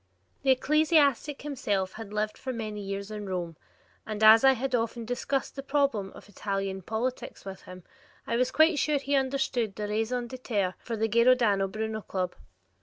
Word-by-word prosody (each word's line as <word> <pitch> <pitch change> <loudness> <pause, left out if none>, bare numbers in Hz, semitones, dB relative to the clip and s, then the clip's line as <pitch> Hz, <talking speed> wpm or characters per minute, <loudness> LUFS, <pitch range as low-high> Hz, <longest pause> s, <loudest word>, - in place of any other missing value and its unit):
The 275 - 0
ecclesiastic 295 0 +3
himself 205 -10 -2
had 220 -2 -8
lived 215 0 -1
for 265 - -8
years 210 -3 -5
in 210 -1 -6
Rome, 175 -3 -3 0.5
and 215 0 -4
as 220 +2 +9
I 270 0 +7
had 260 +1 -3
often 230 0 -1
discussed 255 +3 -2
the 275 - -4
problems 275 -8 0
of - - -13
Italian 195 -1 -3
politics 225 +6 -4
with 190 -1 -7
him, 185 -1 -11 0.4
I 230 - -1
was 250 +1 +2
quite 315 +2 +4
sure 300 -1 +2
he 280 +1 -3
understood 260 -5 0
the 210 -1 -3
raison 225 +4 -1
d'etre 225 -7 -2
for 230 -2 -5
the 220 +1 +1
Giordano 235 -3 +4
Bruno 220 +2 -4
Club. 185 -3 -3
225 Hz, 170 wpm, -28 LUFS, 205-265 Hz, 0.5 s, as